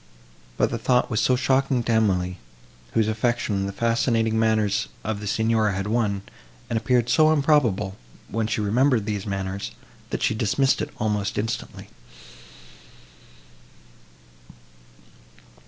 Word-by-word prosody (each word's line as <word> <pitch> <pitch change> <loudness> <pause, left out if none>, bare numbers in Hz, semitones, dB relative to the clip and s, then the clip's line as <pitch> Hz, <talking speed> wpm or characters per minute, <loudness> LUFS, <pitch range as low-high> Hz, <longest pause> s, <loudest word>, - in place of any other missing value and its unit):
But - - +2
the - - -2
thought 125 0 +1
was 110 - +1
so 130 - +3
shocking 130 -1 +1
to 115 - -1
Emily, 90 -5 +1 0.6
whose 110 -2 +3
affection 110 -3 0
the - - -3
fascinating 115 +1 +1
manners 110 -2 +1 0.2
of 110 0 -3
the 105 - -6
Signora 110 0 +1
had 95 +1 -3
won, 105 -3 0 0.5
and - - 0
appeared 120 +1 +1
so 155 +4 +4
improbable, 125 -10 +2 0.3
when 110 +1 -2
she 110 - -1
remembered 115 +2 +2
these 105 -1 -3
manners, 95 0 -3 0.4
that - - -3
she - - +2
dismissed 115 +5 +1
it - - -3
almost 105 -2 -1
instantly. 110 +2 -4
110 Hz, 125 wpm, -24 LUFS, 100-120 Hz, 0.6 s, so